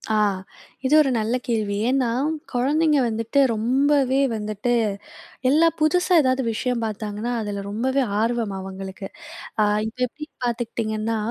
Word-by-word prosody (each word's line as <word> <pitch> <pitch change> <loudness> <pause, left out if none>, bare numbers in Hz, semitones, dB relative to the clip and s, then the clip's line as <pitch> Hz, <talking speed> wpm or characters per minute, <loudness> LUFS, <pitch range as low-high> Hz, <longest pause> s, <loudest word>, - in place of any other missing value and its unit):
ஆ - - +3 0.7
இது 275 - +2
ஒரு 290 - +4
நல்ல 225 +3 0
கேள்வி, 215 -4 0
ஏன்னா 260 -2 +2 0.4
குழந்தைங்க 295 +4 +2
வந்துட்டு 230 +4 0
ரொம்பவே 265 +4 +2 0.2
வந்துட்டு, 215 +2 -2 0.8
எல்லா 320 +4 +5
புதுசா 360 +4 +2
ஏதாவது 260 0 +1
விஷயம் 245 +1 -1
பாத்தாங்கன்னா 215 +2 -3
அதுல 205 -2 -4
ரொம்பவே 260 +6 0 0.2
ஆர்வம் 230 -3 0
அவங்களுக்கு. 190 +1 -7 0.5
அ - - +5 0.2
இப்ப 225 - -9
எப்டின்னு 300 +5 -11
பாத்துக்கிட்டீங்கன்னா, 225 -2 -2
235 Hz, 120 wpm, -23 LUFS, 215-270 Hz, 0.8 s, எல்லா